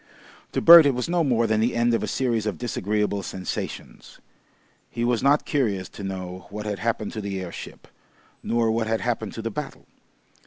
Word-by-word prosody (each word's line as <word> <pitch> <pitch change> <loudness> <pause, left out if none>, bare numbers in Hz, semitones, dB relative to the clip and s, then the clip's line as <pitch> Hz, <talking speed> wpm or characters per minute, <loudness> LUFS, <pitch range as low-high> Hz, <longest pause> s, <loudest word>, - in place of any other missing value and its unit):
To - - 0
Bert 170 -3 +10
it 135 - +1
was 125 - -2
no 170 0 +1
more 120 -5 +2
than 110 -1 +1
the 115 +2 +1
end 120 0 +2
of 115 - +1
a - - -2
series 115 -5 -1
of 105 - -2
disagreeable 105 -3 -1
sensations. 95 -1 -6 0.7
He 120 - -4
was 120 -1 +1
not 140 +2 +3
curious 105 -10 -1
to 100 - -10
know 95 -1 -6
what 105 +1 -6
had 105 -2 -3
happened 110 -2 -2
to 110 - -4
the 100 -1 -4
airship, 90 -2 -9 0.5
nor 115 -1 +1
what 110 0 -1
had 110 0 0
happened 115 -3 -2
to 115 - -6
the 115 - -3
battle. 145 +6 -7
115 Hz, 195 wpm, -24 LUFS, 100-120 Hz, 0.7 s, Bert